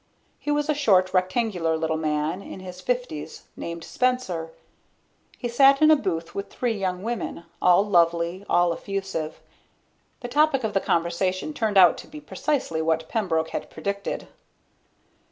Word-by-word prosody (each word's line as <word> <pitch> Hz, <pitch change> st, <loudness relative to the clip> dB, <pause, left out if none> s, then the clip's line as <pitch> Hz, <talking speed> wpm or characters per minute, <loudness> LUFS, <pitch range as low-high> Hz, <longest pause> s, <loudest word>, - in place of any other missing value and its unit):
He -, -, -6 dB
was 295 Hz, 0 st, +1 dB
a 305 Hz, -, +2 dB
short, 195 Hz, -11 st, +3 dB
rectangular 185 Hz, -3 st, +1 dB
little 160 Hz, 0 st, -1 dB
man 155 Hz, +3 st, -1 dB
in 195 Hz, -, -9 dB
his 185 Hz, -1 st, -9 dB
fifties 245 Hz, -9 st, -3 dB
named 170 Hz, 0 st, -6 dB
Spencer. 250 Hz, -11 st, -1 dB, 0.9 s
He 245 Hz, -, -3 dB
sat 270 Hz, +3 st, +5 dB
in 310 Hz, 0 st, +6 dB
a -, -, +8 dB
booth 170 Hz, -, -3 dB
with 200 Hz, -, -5 dB
three 245 Hz, -2 st, -1 dB
young 185 Hz, -2 st, -2 dB
women, 225 Hz, -6 st, -4 dB, 0.2 s
all 180 Hz, +2 st, +5 dB
lovely, 170 Hz, -1 st, +2 dB
all 175 Hz, -1 st, +3 dB
effusive. 195 Hz, -4 st, -4 dB, 0.8 s
The 245 Hz, -, -4 dB
topic 285 Hz, 0 st, +2 dB
of 220 Hz, -2 st, -1 dB
the 195 Hz, -, +3 dB
conversation 185 Hz, -, 0 dB
turned 220 Hz, -7 st, 0 dB
out 180 Hz, -3 st, +7 dB
to -, -, -10 dB
be 305 Hz, -, -9 dB
precisely 280 Hz, -, -2 dB
what 160 Hz, 0 st, 0 dB
Pembroke 165 Hz, -7 st, 0 dB
had -, -, -5 dB
predicted. 200 Hz, 0 st, -4 dB
185 Hz, 155 wpm, -25 LUFS, 170-240 Hz, 0.9 s, a